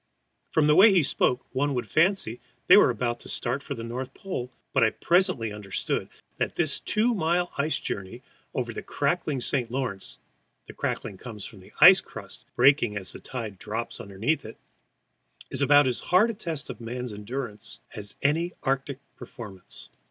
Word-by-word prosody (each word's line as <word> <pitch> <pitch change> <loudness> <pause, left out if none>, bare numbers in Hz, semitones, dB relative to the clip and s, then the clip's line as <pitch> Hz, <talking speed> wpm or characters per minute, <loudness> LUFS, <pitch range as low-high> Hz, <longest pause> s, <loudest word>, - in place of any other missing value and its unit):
From 155 - +3
the 150 - +5
way 200 +7 +8
he 180 -4 +4
spoke 125 -2 +1
one 140 +1 0
would 125 - -2
fancy 165 - +2 0.3
they 185 - +8
were 205 - +7
about 120 0 -1
to - - -11
start 125 +3 -1
for - - -5
the 115 - -6
North 125 +3 -5
Pole, 130 -11 -5 0.2
but 135 - +4
I 115 - +5
presently 170 - +1
understood 105 -2 -3 0.3
that - - -1
this 155 -4 0
two 225 +3 +1
mile 175 -2 +1
ice 150 +3 +1
journey 100 +6 -5 0.3
over 120 -2 -2
the - - -5
crackling 145 -2 -1
St. 120 -1 0
Lawrence 125 -6 -3 0.5
the - - -11
crackling 100 -4 -3
comes 110 -5 -8
from 105 - -10
the 95 - -16
ice - - +10
crust - - -11
breaking 120 -5 +4
as 95 -2 -1
the - - -9
tide 110 -7 -6
drops 110 +2 -4
under 100 -2 -10
it 135 -5 0 0.9
is - - +2
about 145 +1 +6
as 125 -2 +1
hard 210 +6 +3
a - - -7
test 165 -8 -4
of - - -11
men's 120 0 -5
endurance 105 0 -6
as 105 -3 -5
any 165 +5 +1
Arctic 135 0 -1 0.2
performance. 100 -6 -10
130 Hz, 175 wpm, -26 LUFS, 115-155 Hz, 0.9 s, ice